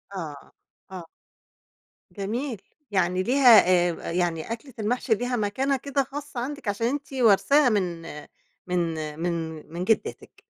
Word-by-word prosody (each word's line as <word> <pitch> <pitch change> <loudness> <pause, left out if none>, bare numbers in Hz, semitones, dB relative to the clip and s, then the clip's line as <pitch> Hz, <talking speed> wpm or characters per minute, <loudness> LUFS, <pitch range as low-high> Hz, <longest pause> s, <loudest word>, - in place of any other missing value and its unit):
آه، 150 -6 -7 0.4
آه. 185 -3 -7 1.1
جميل، 225 +3 -4 0.3
يعني 185 -1 +1
ليها 245 -2 +7
آآ، 175 -1 +4 0.2
آآ - - -3
يعني 175 +2 -1
أكلة 240 +3 -7
المحشي 235 +3 0
ليها 245 +3 -2
مكانة 255 +6 0
كده 275 +1 -1
خاصّة 280 -1 -7
عندِك 280 0 -5
عشان 205 +3 0
أنتِ 280 +1 -4
وارثاها 255 +4 +4
من 180 -6 -1 0.7
من 180 0 0 0.4
من 165 -2 -3
من 175 - -3
جدتِك. 220 +3 -2
215 Hz, 130 wpm, -25 LUFS, 180-260 Hz, 1.1 s, ليها